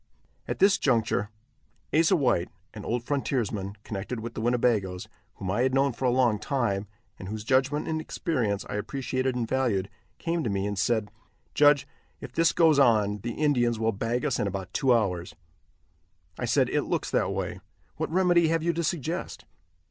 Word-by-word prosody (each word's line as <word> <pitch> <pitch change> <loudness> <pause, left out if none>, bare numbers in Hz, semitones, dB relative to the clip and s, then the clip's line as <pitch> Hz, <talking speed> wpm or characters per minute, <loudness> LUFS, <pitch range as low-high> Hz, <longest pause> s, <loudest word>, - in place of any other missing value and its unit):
At - - -3
this 195 +1 +4
juncture 115 -5 +1 0.6
Asa 165 +4 +4
White, 120 - +1 0.2
an - - -8
old 120 0 -2
frontiersman, 115 -8 -2
connected 105 +4 -5
with 115 +1 -6
the - - -5
Winnebagoes, 110 -6 +1 0.3
whom 95 -1 -4
I 105 - +1
had 130 +1 +2
known 135 -1 +2
for 130 - -4
a - - +4
long 120 -4 +2
time, 110 -6 -1 0.3
and 95 - -7
whose 105 +1 -5
judgment 135 +5 +1
and 160 -1 -1
experience 120 - -2
I - - -4
appreciated 130 +3 -2
and 120 -2 -1
valued, 110 -8 0 0.3
came 165 -1 -2
to 115 - -1
me 100 -1 -1
and 105 0 -2
said: 105 +2 0 0.4
"Judge, 145 -2 +5 0.3
if 125 - -9
this 165 +3 +3
goes 160 -4 +4
on, 105 -5 +3
the 115 +3 -4
Indians 120 -6 +1
will 110 +1 +1
bag 115 +5 -2
us 135 -5 0
in - - 0
about 95 -1 -5
two 135 -3 +2
hours." 90 -7 0 1.0
I - - -1
said: - - +3
"It - - +1
looks - - -2
that - - +1
way; - - -3 0.4
what - - -2
remedy 175 -1 +3
have 165 0 +1
you 170 0 +1
to 170 +1 -2
suggest." 165 +2 -3
120 Hz, 180 wpm, -27 LUFS, 105-145 Hz, 1.0 s, Judge